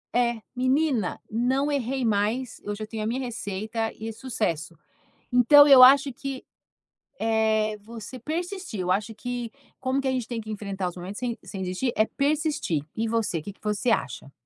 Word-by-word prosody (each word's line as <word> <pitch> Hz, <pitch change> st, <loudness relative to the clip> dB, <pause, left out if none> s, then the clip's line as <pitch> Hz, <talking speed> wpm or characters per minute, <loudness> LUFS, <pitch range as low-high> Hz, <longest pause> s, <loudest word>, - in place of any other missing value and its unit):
É, 235 Hz, -2 st, +1 dB
menina, 255 Hz, -, +1 dB
não 260 Hz, +6 st, +1 dB
errei 265 Hz, -2 st, -1 dB
mais. 220 Hz, +4 st, 0 dB
Eu 205 Hz, -, -3 dB
já 215 Hz, +1 st, -5 dB
tenho 215 Hz, 0 st, -5 dB
a -, -, -1 dB
minha 240 Hz, +4 st, -1 dB
receita 225 Hz, -2 st, -3 dB
e 220 Hz, -, -6 dB
é 225 Hz, -, -3 dB
sucesso. 210 Hz, -, -3 dB, 0.5 s
Então 285 Hz, +4 st, +8 dB
eu 265 Hz, -2 st, +10 dB
acho 275 Hz, +1 st, +7 dB
que 270 Hz, +1 st, -6 dB, 0.8 s
é 220 Hz, -1 st, +1 dB
você 225 Hz, +3 st, -9 dB
persistir. 345 Hz, -, -4 dB
Eu 180 Hz, -, 0 dB
acho 210 Hz, +4 st, 0 dB
que, 245 Hz, 0 st, -4 dB, 0.3 s
como 260 Hz, +1 st, 0 dB
que 275 Hz, -, -1 dB
a 265 Hz, -, +2 dB
gente 250 Hz, -3 st, -2 dB
tem 235 Hz, -2 st, -3 dB
que 220 Hz, 0 st, -7 dB
enfrentar 200 Hz, -3 st, -3 dB
os 175 Hz, -, -12 dB
momentos 185 Hz, +3 st, -7 dB
sem 245 Hz, -2 st, -2 dB
sem 195 Hz, -2 st, -7 dB
desistir, 185 Hz, +8 st, -1 dB
é 215 Hz, -, +4 dB
persistir. 290 Hz, -, 0 dB
E 225 Hz, +1 st, -1 dB
você, 220 Hz, -7 st, 0 dB
que 200 Hz, +6 st, -8 dB
que -, -, -32 dB
você 210 Hz, +3 st, 0 dB
acha? 140 Hz, -, -1 dB
225 Hz, 185 wpm, -26 LUFS, 210-260 Hz, 0.8 s, eu